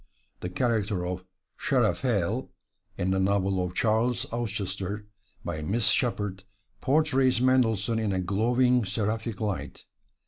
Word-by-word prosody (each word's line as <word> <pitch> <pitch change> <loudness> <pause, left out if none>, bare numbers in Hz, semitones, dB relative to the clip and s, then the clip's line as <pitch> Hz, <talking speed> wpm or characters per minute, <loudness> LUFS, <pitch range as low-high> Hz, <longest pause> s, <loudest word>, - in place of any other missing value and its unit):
The 90 - -4
character 105 -3 0
of 90 +1 -4 0.3
"Seraphael" - - +1 0.5
in 90 +1 0
the 95 - +2
novel 95 -1 +1
of 90 0 -4
"Charles 115 +3 +1
Auchester," 100 -3 -3 0.4
by 80 -3 -3
Miss 100 +6 +1
Sheppard, 105 -5 0 0.4
portrays 135 -3 +3
Mendelssohn 115 -4 +2
in 110 -2 0
a 95 - 0
glowing, 120 +6 +2
seraphic 110 +1 -2
light. 105 -4 -4
105 Hz, 115 wpm, -27 LUFS, 95-120 Hz, 0.5 s, portrays